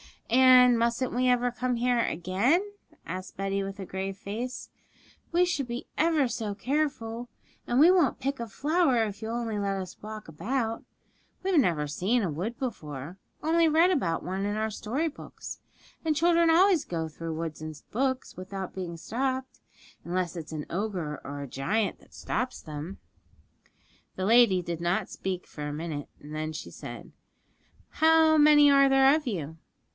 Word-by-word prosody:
'And 250 -1 +7
mustn't 235 +2 0
we 250 +1 +1
ever 245 0 +3
come 250 0 -1
here 245 0 +1
again?' 225 - +1 0.4
asked 185 0 -6
Betty, 195 0 -1
with 195 +1 -5
a 190 - -5
grave 190 +1 -4
face. 230 +6 -5 0.6
'We 350 +1 +4
should 290 -7 -1
be 240 +1 -5
ever 315 -4 +3
so 215 -4 -3
careful, 245 -3 -2 0.4
and 240 +2 +2
we 325 +5 +8
won't 340 -10 +3
pick 275 0 -2
a 235 - -4
flower 285 - +2
if 205 -1 -5
you'll 225 +1 -3
only 225 -3 -2
let 195 -1 -1
us 185 -1 -8
walk 215 0 -8
about. 225 - -2 0.6
We've 375 -4 +3
never 165 - +2
seen 195 +11 0
a 175 - -1
wood 195 +11 -4
before, 155 - -5 0.3
only 330 +1 +4
read 325 +4 +4
about 170 - 0
one 190 +2 -2
in 205 0 -1
our 220 0 -1
story 250 +10 -2
books; 300 - -9 0.4
and 315 -2 +1
children 335 +1 +4
always 350 0 +5
go 165 -2 -3
through 160 +1 -6
woods 160 -1 -5
in 155 0 -5 0.2
books 260 +2 -1
without 190 0 -6
being 175 -3 -5
stopped, 260 +7 -3 0.4
unless 180 0 -2
it's 160 -2 -7
an 150 -1 -4
ogre 180 -6 -3
or 145 0 -6
a 140 - -5
giant 200 - -1
that - - -22
stops 255 0 -3
them.' 155 +5 -7 1.2
The 185 - -2
lady 225 -4 +5
did 170 -1 -4
not 175 +2 0
speak 185 -1 -4
for 150 -1 -7
a 145 - -4
minute, 150 -2 -5
then 155 +1 -5
she 155 - -7
said, - - -9 0.9
'How 320 0 +6
many 295 -1 +7
are 275 0 +6
there 270 0 +6
of 305 -3 -1
you?' 160 -8 -4
225 Hz, 170 wpm, -28 LUFS, 180-270 Hz, 1.2 s, we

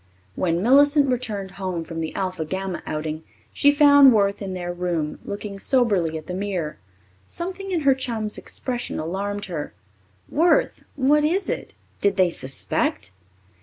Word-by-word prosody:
When 170 - 0
Millicent 285 +3 +5
returned 215 -6 -3
home 185 -3 -4
from 165 0 -6
the 160 - -4
Alpha 185 -3 -2
Gamma 190 +2 -4
outing, 155 +1 -4 0.3
she 285 - +5
found 285 -2 +7
Worth 200 -1 +1
in 190 -2 -4
their 175 -1 -4
room, 175 -4 -2
looking 200 -1 -6
soberly 200 -11 +1
at 155 - -9
the 180 - -6
mirror. 185 -5 -3 0.5
Something 375 +3 -5
in 350 -4 0
her 275 -2 +5
chum's 230 -5 -3
expression 245 -2 -4
alarmed 200 +5 -3
her. 165 -6 -5 0.5
"Worth, 350 - +2
what 290 +2 +3
is 360 +6 0
it? - - -4 0.3
Did 200 -1 +2
they 185 -2 +4
suspect?" 130 - -1
200 Hz, 150 wpm, -23 LUFS, 175-270 Hz, 0.5 s, found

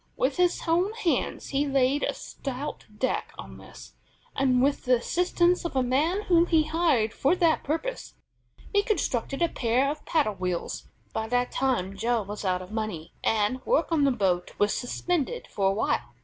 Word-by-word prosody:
With 265 +1 0
his 360 -1 +2
own 355 +6 +2
hands 440 -7 -1
he 285 +1 0
laid 275 +1 +2
a - - -1
stout 275 +1 -6
deck 260 +4 -2
on - - -10
this, - - -13 0.4
and, 260 -2 +3
with 280 +3 +1
the 250 0 +5
assistance 350 +7 +1
of 340 -5 -4
a 260 - +3
man 310 +11 +1
whom 345 -2 +4
he 320 -2 +4
hired 310 -9 +1
for 280 +7 +2
that 335 -3 +2
purpose, 415 - -3 0.6
he 405 - +5
constructed 310 - -1
a - - +4
pair 255 0 +1
of 300 0 -7
paddle 295 -10 +2
wheels. 180 -2 -4 0.3
By 220 - -2
that 245 +1 0
time 240 -8 0
Joe 230 +2 0
was 205 +2 -7
out 185 -1 0
of 185 - -12
money, 215 -8 -4
and 220 +4 +1
work - - +1
on 315 -3 +3
the 280 - +4
boat 185 -6 0
was 205 0 +2
suspended 350 - -2
for 195 -1 +1
awhile. 120 - -1
270 Hz, 175 wpm, -27 LUFS, 220-330 Hz, 0.6 s, the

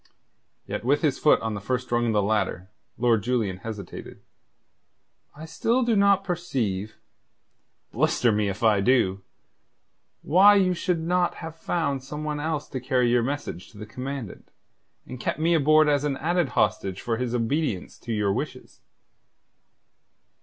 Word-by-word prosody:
Yet - - -5
with 145 +6 +1
his 145 -4 +1
foot 150 - +4
on 110 -1 -2
the 100 - -5
first 125 +3 -3
rung 120 0 +1
of 115 - +1
the 105 -1 +2
ladder, 100 -2 -1 0.3
Lord 115 -2 +2
Julian 110 -5 -1
hesitated. 100 -1 -8 1.2
"I 155 +2 -9
still 230 +10 0
do 235 -2 +1
not 200 -1 +4
perceive 125 - -3 1.0
blister 120 - +2
me 105 -1 +1
if 100 +3 -6
I 105 -3 +4
do! 100 -5 +2 1.0
why 195 +6 +6
you 185 -2 +3
should 175 0 -1
not 175 +1 +1
have 160 -1 -8
found 155 -5 -2
some 150 +3 -6
one 150 -1 -3
else 155 -1 -2
to 130 - -4
carry 125 -2 +1
your 120 0 +3
message 125 - -4
to - - -15
the 105 - -7
Commandant, 125 0 -7 0.6
and 125 - -9
kept - - -2
me 165 +2 +2
aboard 155 0 +4
as 145 -1 +2
an 140 -2 -1
added 170 -1 0
hostage 95 -1 0
for 115 -1 -2
his 125 0 -2
obedience 120 - -2
to 120 - -7
your 105 -3 +1
wishes." - - -6
130 Hz, 160 wpm, -25 LUFS, 110-160 Hz, 1.2 s, why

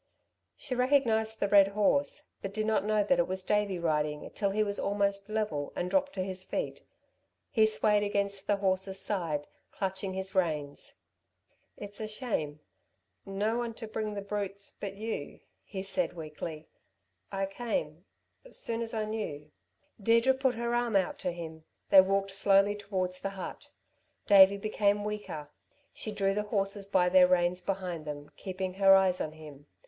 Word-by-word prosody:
She 275 - -5
recognised 235 -4 +2
the 200 - +1
red 200 -1 +7
horse, 280 +9 +1
but 195 0 -6
did 215 0 0
not 220 -3 +2
know 210 0 +2
that 265 +7 +2
it 170 - +3
was 185 0 -3
Davey 205 -2 +1
riding 150 -3 -1
till 200 - 0
he 215 +2 +1
was 205 -1 -3
almost 200 0 0
level, 210 -10 -2
and 180 - -2
dropped 285 0 +2
to 185 - -2
his 185 0 -3
feet. - - -3 0.7
He 220 -3 +5
swayed 210 -1 +3
against 200 -1 -1
the 205 - +3
horse's 190 -1 0
side, 170 -7 -1 0.3
clutching 190 -1 -3
his 190 0 -3
reins. 155 -6 -1 0.8
"It's 205 0 -8
a 215 - -3
shame... 185 - -3 0.7
no 210 +4 0
one 235 -2 -3
to 225 - -7
bring 215 -1 -3
the 200 - -4
brutes 200 -1 -4
but 195 -1 -5
you," 215 -8 -5 0.2
he 190 -2 -6
said 185 -3 -1
weakly. 155 -1 -7 0.6
"I 195 0 -1
came 195 -6 -3 0.4
soon 230 - -3
as 230 -1 -3
I 215 -1 0
knew." 155 -9 -5 0.5
Deirdre 230 +5 +4
put 260 -2 +1
her 235 +1 -2
arm 240 -2 +1
out 190 -2 +1
to 180 - -1
him. 160 -2 -8 0.3
They 190 - +10
walked 195 +1 0
slowly 195 +1 +4
towards 190 -3 -2
the 195 - -3
hut. 185 - -7 0.6
Davey 200 -1 +8
became 205 0 +1
weaker. 205 -8 -5 0.4
She 215 - -5
drew 195 -1 +1
the 210 - 0
horses 200 -1 -1
by 185 -3 +3
their 180 0 +7
reins 180 0 +2
behind 180 -4 -3
them, 145 0 -7
keeping 190 -1 -4
her 195 0 +7
eyes 190 -1 +3
on 155 - -3
him. 150 -2 -12
195 Hz, 165 wpm, -30 LUFS, 185-215 Hz, 0.8 s, They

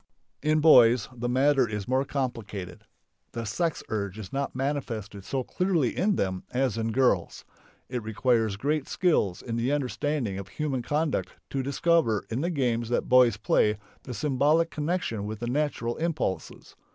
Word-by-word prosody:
In 155 +1 +2
boys 125 -7 +6
the 120 0 -3
matter 130 -1 +3
is 105 -2 -4
more 130 +2 +1
complicated. 110 -10 -4 0.5
The 115 -1 -4
sex 165 +10 -1
urge 100 -2 -3
is 100 -4 -8
not 140 -1 -2
manifested 120 -8 -3
so 130 +5 -2
clearly 175 -4 0
in 200 +2 +2
them 95 - -1
as 125 -3 0
in 115 0 -1
girls. 130 +2 +1 0.4
It 125 -1 -3
requires 110 -1 +1
great 145 +6 -1
skill 105 - +1
in 115 -2 -3
the 120 +4 0
understanding 140 -6 -1
of 100 - -7
human 135 +3 -2
conduct 150 +4 -1 0.2
to 135 - -1
discover 140 -4 +1
in 120 +4 -1
the 170 - 0
games 120 -7 0
that 120 - -1
boys 125 -4 +6
play 105 0 +2 0.2
the 125 - -7
symbolic 150 +5 +2
connection 150 - -2
with 110 +1 -4
the 120 - -3
natural 125 -3 -1
impulses. 155 - -3
125 Hz, 160 wpm, -27 LUFS, 110-145 Hz, 0.5 s, boys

